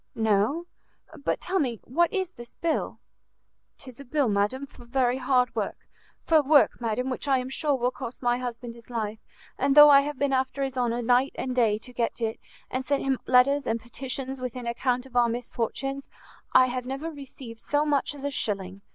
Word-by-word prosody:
"No. 220 Hz, +9 st, +1 dB, 0.5 s
But 280 Hz, -, -2 dB
tell 380 Hz, +1 st, -1 dB
me, 240 Hz, -7 st, -1 dB
what 340 Hz, +7 st, +1 dB
is 375 Hz, -2 st, -2 dB
this 240 Hz, -7 st, -13 dB
bill?" 335 Hz, -1 st, -2 dB, 0.8 s
"'Tis 255 Hz, -3 st, -11 dB
a -, -, -8 dB
bill, 275 Hz, -1 st, +1 dB
madam, 210 Hz, +7 st, 0 dB
for 260 Hz, -3 st, -16 dB
very 245 Hz, +1 st, +1 dB
hard 250 Hz, -1 st, +2 dB
work, -, -, -2 dB, 0.5 s
for 320 Hz, -2 st, +5 dB
work, 290 Hz, -3 st, +4 dB
madam, 240 Hz, +3 st, -1 dB
which 255 Hz, -, -4 dB
I 270 Hz, -1 st, +4 dB
am 255 Hz, 0 st, -3 dB
sure 290 Hz, +1 st, +1 dB
will 250 Hz, -1 st, 0 dB
cost 255 Hz, -1 st, -8 dB
my 245 Hz, 0 st, +2 dB
husband 240 Hz, -1 st, -5 dB
his 235 Hz, 0 st, -16 dB
life; 220 Hz, -2 st, -3 dB, 0.4 s
and 275 Hz, +1 st, +2 dB
though 295 Hz, 0 st, +10 dB
I 280 Hz, 0 st, +8 dB
have 290 Hz, 0 st, -4 dB
been 280 Hz, 0 st, 0 dB
after 265 Hz, +1 st, 0 dB
his 265 Hz, -1 st, -3 dB
honour 240 Hz, -1 st, 0 dB
night 250 Hz, +3 st, +3 dB
and 255 Hz, -1 st, -3 dB
day 225 Hz, -4 st, +3 dB
to 250 Hz, +3 st, -12 dB
get 235 Hz, 0 st, -2 dB
it, 225 Hz, -1 st, -2 dB, 0.3 s
and 255 Hz, +1 st, -2 dB
sent 280 Hz, +1 st, 0 dB
him 270 Hz, -1 st, 0 dB
letters 275 Hz, +3 st, +4 dB
and 225 Hz, +1 st, 0 dB
petitions 260 Hz, +2 st, -5 dB
with 250 Hz, -2 st, -4 dB
an 250 Hz, -1 st, -6 dB
account 245 Hz, +1 st, -1 dB
of 260 Hz, -2 st, -16 dB
our 240 Hz, -1 st, +4 dB
misfortunes, 245 Hz, +3 st, -3 dB, 0.4 s
I 255 Hz, -, +7 dB
have 250 Hz, 0 st, -4 dB
never 275 Hz, +5 st, -4 dB
received 265 Hz, -5 st, -10 dB
so 295 Hz, +4 st, 0 dB
much 290 Hz, -1 st, 0 dB
as 280 Hz, -, -10 dB
a 285 Hz, -, -1 dB
shilling! 195 Hz, -6 st, -3 dB
255 Hz, 205 wpm, -26 LUFS, 240-275 Hz, 0.8 s, though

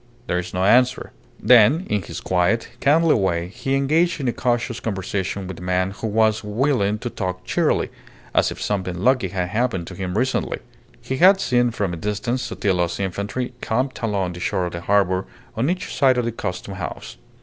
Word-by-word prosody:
"There 90 Hz, -, 0 dB
is 90 Hz, 0 st, -6 dB
no 90 Hz, 0 st, -1 dB
answer." 125 Hz, +5 st, +3 dB, 0.3 s
Then, 125 Hz, -, +5 dB
in 105 Hz, -1 st, 0 dB
his -, -, -7 dB
quiet, 95 Hz, +5 st, +1 dB
kindly 160 Hz, +3 st, +4 dB
way, 90 Hz, -4 st, 0 dB
he 120 Hz, +6 st, -2 dB
engaged 155 Hz, +6 st, +2 dB
in 135 Hz, -, -2 dB
a 120 Hz, -, +1 dB
cautious 120 Hz, -1 st, -1 dB
conversation 95 Hz, -1 st, -3 dB
with 90 Hz, -2 st, -7 dB
the -, -, -10 dB
man, 90 Hz, +1 st, 0 dB
who 105 Hz, +3 st, -5 dB
was 110 Hz, 0 st, +2 dB
willing 105 Hz, -1 st, +1 dB
to 120 Hz, +3 st, -4 dB
talk 90 Hz, -2 st, -4 dB
cheerily, -, -, +1 dB, 0.4 s
as -, -, +3 dB
if -, -, -7 dB
something 95 Hz, -3 st, -2 dB
lucky 125 Hz, -4 st, +3 dB
had 90 Hz, -1 st, -3 dB
happened 110 Hz, -5 st, -1 dB
to 90 Hz, -, -9 dB
him 95 Hz, +1 st, -3 dB
recently. 130 Hz, +3 st, 0 dB, 0.4 s
He 130 Hz, -, -3 dB
had 190 Hz, +5 st, +6 dB
seen 120 Hz, -8 st, +2 dB
from 100 Hz, -6 st, -2 dB
a -, -, -4 dB
distance 105 Hz, +7 st, -2 dB
Sotillo's 95 Hz, -8 st, -1 dB
infantry 100 Hz, +6 st, -3 dB
camped 130 Hz, +4 st, -1 dB
along 100 Hz, -5 st, -1 dB
the 85 Hz, -, -8 dB
shore 90 Hz, +1 st, -1 dB
of 90 Hz, -, -4 dB
the 85 Hz, -, -5 dB
harbour 95 Hz, -1 st, +2 dB, 0.3 s
on 120 Hz, +6 st, 0 dB
each 180 Hz, +1 st, -3 dB
side 130 Hz, -3 st, +4 dB
of 125 Hz, -, +1 dB
the 120 Hz, -, -1 dB
Custom 95 Hz, -2 st, -5 dB
House. 90 Hz, -9 st, -6 dB
105 Hz, 195 wpm, -22 LUFS, 95-125 Hz, 0.4 s, had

